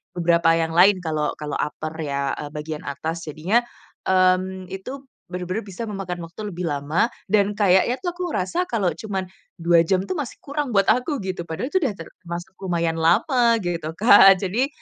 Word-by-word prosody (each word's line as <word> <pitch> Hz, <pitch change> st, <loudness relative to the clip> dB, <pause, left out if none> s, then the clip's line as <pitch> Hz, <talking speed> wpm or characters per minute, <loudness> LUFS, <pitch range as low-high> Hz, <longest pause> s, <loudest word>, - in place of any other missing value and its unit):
beberapa 170 Hz, -1 st, +3 dB
yang 165 Hz, 0 st, 0 dB
lain 185 Hz, +3 st, +5 dB
kalau 155 Hz, -2 st, -1 dB
kalau 150 Hz, -1 st, -4 dB
upper 155 Hz, +1 st, -3 dB
ya, 140 Hz, -3 st, -2 dB
eee, 150 Hz, -, -5 dB
bagian 150 Hz, 0 st, -6 dB
atas. 160 Hz, +4 st, -4 dB
Jadinya, 165 Hz, +10 st, +1 dB, 0.5 s
mmm, 185 Hz, 0 st, +2 dB
itu 255 Hz, +9 st, -7 dB, 0.3 s
bener-bener 180 Hz, +4 st, -3 dB
bisa 205 Hz, +3 st, -7 dB
memakan 195 Hz, -4 st, -5 dB
waktu 205 Hz, +5 st, -7 dB
lebih 175 Hz, 0 st, -4 dB
lama 150 Hz, +8 st, 0 dB, 0.2 s
dan 205 Hz, -1 st, +3 dB
kayaknya 200 Hz, +3 st, +3 dB
tuh 355 Hz, -, -1 dB
aku 365 Hz, -, -4 dB
ngerasa 340 Hz, -, -1 dB
kalau 200 Hz, -7 st, 0 dB
cuma 195 Hz, 0 st, -4 dB, 0.4 s
2 170 Hz, 0 st, +4 dB
jam 185 Hz, +2 st, +1 dB
tuh -, -, -7 dB
masih 290 Hz, -7 st, -4 dB
kurang 280 Hz, -4 st, -3 dB
buat 195 Hz, -1 st, +4 dB
aku 255 Hz, -, -1 dB
gitu, 185 Hz, -2 st, -4 dB
padahal 165 Hz, -, -4 dB
itu 375 Hz, -, +3 dB
udah 225 Hz, -8 st, 0 dB
termasuk 170 Hz, +2 st, -8 dB
lumayan 170 Hz, -3 st, -1 dB
lama 235 Hz, -, +3 dB
gitu 170 Hz, -3 st, -3 dB
kan. 195 Hz, -3 st, +8 dB
Jadi 210 Hz, +8 st, 0 dB
185 Hz, 175 wpm, -23 LUFS, 165-210 Hz, 0.5 s, kan